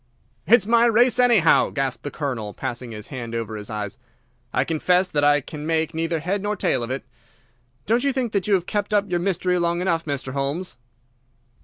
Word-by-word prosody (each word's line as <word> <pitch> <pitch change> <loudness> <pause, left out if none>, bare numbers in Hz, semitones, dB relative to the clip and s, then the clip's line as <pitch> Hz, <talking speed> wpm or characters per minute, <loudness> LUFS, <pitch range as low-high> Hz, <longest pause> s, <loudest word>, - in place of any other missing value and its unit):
"It's 225 +1 +5
my 235 +2 +4
race, 240 +2 +4
anyhow," 235 -9 +5
gasped 135 -3 -2
the 145 - -5
Colonel, 125 -9 -4
passing 120 0 -5
his 105 -1 -8
hand 120 -4 -6
over 115 -1 -4
his 105 -1 -7
eyes. 105 +2 -5 0.5
"I - - +1
confess 180 +3 +2
that 150 -5 -1
I 145 0 +4
can 150 +2 -8
make 160 0 0
neither 165 +1 -1
head 190 +6 -2
nor 205 +1 -1
tail 180 - 0
of 120 - -4
it. 130 +1 -4 0.8
Don't 235 +3 +2
you 280 - +2
think 255 -4 -2
that 200 -2 -1
you 205 - +4
have 180 -2 -1
kept 205 +1 -1
up 205 -2 +1
your 175 - +1
mystery 180 0 0
long 170 0 0
enough, 170 -3 0
Mr. 140 -3 -4
Holmes?" 140 +6 -3
165 Hz, 200 wpm, -23 LUFS, 135-200 Hz, 0.8 s, It's